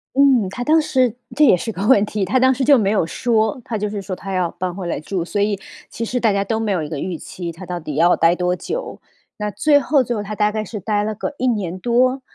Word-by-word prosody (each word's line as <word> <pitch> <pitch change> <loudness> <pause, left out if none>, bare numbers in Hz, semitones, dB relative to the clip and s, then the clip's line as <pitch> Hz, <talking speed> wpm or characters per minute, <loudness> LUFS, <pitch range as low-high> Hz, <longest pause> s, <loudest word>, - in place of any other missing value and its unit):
嗯， 265 -8 +4
她 245 +5 -5
当 315 +3 +4
时 255 -6 +1 0.2
这 300 - +5
也 185 - +6
是 225 +6 -4
个 200 +2 -3
问 210 -6 +5
题， 205 -2 -2
她 215 +8 +1
当 260 +1 +4
时 260 0 -1
就 280 -2 +6
没 200 -2 +1
有 195 -6 +2
说， 220 +4 0
她 225 - -3
就 210 0 -2
是 205 -1 -4
说 190 0 -6
她 195 +1 -7
要 180 -2 0
搬 180 -1 -4
回 185 -3 -5
来 165 - -2
住， 175 +2 -3
所 205 +4 -3
以 205 -1 +1 0.3
其 230 - -5
实 250 +2 -1
大 220 -4 +2
家 200 0 +1
都 220 +2 -2
没 215 -2 -1
有 165 -4 -1
一 150 - -6
个 150 -3 -4
预 180 -3 -3
期， 175 +1 -7
她 180 +3 -10
到 175 0 -4
底 150 -3 -6
要 170 +3 +4
待 165 +1 +3
多 180 0 0
久。 - - -5 0.4
那 210 0 -2
最 290 +4 +3
后 280 -2 +2
最 240 0 -2
后 210 - -2
她 210 +1 -6
大 210 0 +2
概 215 0 -3
是 210 +1 -6
待 205 +1 0
了 215 0 -3
个 260 - -4
1 255 - 0
年 185 -6 -1
多， 255 +3 +2
210 Hz, 295 characters per minute, -20 LUFS, 185-245 Hz, 0.4 s, 也